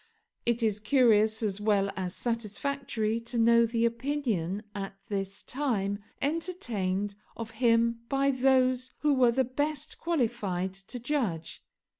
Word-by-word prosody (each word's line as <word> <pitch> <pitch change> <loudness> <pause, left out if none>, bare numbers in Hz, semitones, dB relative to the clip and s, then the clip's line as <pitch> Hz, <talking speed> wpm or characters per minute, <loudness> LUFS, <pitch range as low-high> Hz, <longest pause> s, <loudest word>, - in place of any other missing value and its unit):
It 235 0 +1
is 215 -2 +1
curious 220 -2 +4
as 205 -1 -1
well 200 -2 +2
as 185 0 -3
satisfactory 230 0 -2
to 235 +1 -5
know 235 0 +5
the 230 0 +1
opinion 230 - -1
at 195 -1 -5
this 195 -1 -3
time 210 -8 -1 0.2
entertained 230 - -1 0.2
of 225 -1 -5
him 230 0 +3
by 275 0 +2
those 255 -1 +3
who 295 -1 +3
were 250 -3 +5
the 260 +3 +2
best 290 +4 -3
qualified 220 - -1
to 195 +6 -9
judge. 230 - -2
230 Hz, 130 wpm, -29 LUFS, 205-260 Hz, 0.2 s, know